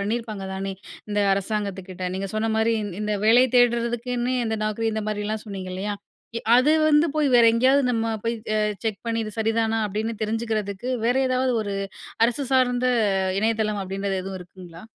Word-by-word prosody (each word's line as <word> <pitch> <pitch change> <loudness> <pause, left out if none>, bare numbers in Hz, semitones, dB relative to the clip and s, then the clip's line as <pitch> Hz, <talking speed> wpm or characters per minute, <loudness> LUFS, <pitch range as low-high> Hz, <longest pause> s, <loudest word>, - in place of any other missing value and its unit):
பண்ணியிருப்பாங்க 215 -1 -3
தானே! 195 0 -3 0.4
இந்த 205 0 +1
அரசாங்கத்துக்கிட்ட. 195 -2 -3
நீங்க 195 +1 -3
சொன்னமாரி 220 +1 +1
இந் 205 -2 -5
இந்த 210 0 -1
வேலை 240 +3 +6
தேடுறதுக்குன்னு 240 +1 +1
இந்த 220 -1 -1
Naukri 215 +1 -1
இந்தமாரிலாம் 215 0 -3
சொன்னீங்க 190 -3 -6
இல்லையா? 205 +2 -3 0.4
எ - - -8 0.2
அது 270 +5 +4 0.2
வந்து 300 +2 +5
போய் 300 -2 +3
வேற 235 - +6
எங்கேயாவது 260 +4 +4
நம்ம 225 -1 0 0.2
போய் 230 - 0 0.2
அ - - +2 0.3
செக் 215 -4 -2
பண்ணி 230 0 0
இது 215 - -5
சரிதானா? 225 0 +1
அப்பிடின்னு 215 +2 -3
தெரிஞ்சுக்கிறதுக்கு 215 -1 -2 0.2
வேற 245 - +3
ஏதாவது 255 0 +1
ஒரு 200 -1 -4 0.5
அரசு 245 +4 0
சார்ந்த 250 -1 +3 0.5
இணையதளம் 215 -1 0
அப்பிடின்றது 195 0 -3
எதுவும் 190 0 -6
இருக்குங்களா? 180 -1 -12
220 Hz, 155 wpm, -24 LUFS, 200-235 Hz, 0.5 s, வேலை